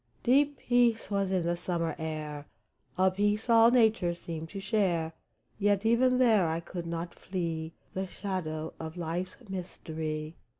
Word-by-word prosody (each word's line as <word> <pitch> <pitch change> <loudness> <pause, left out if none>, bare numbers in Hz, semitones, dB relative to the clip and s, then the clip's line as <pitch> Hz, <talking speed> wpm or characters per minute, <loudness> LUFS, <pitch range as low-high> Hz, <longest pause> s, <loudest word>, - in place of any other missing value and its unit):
Deep 280 +3 +4
peace 240 -3 +2
was 200 -1 +1
in 185 -3 +1
the 170 0 +1
summer 170 -2 -1
air, 150 -2 -5 0.5
A 190 0 +4
peace 205 +4 +1
all 230 0 +8
nature 220 -8 +3
seemed 165 -2 -6
to 195 - -6
share; 185 -5 0 0.5
Yet 205 0 +2
even 250 +3 +4
there 220 -8 +5
I 160 +1 -1
could 170 0 -6
not 170 +1 -4
flee 165 -3 -4 0.2
The 190 0 -2
shadow 160 -6 -4
of 160 +1 -6
life's 175 +2 -3
mystery 160 -4 -5
180 Hz, 145 wpm, -30 LUFS, 165-210 Hz, 0.5 s, all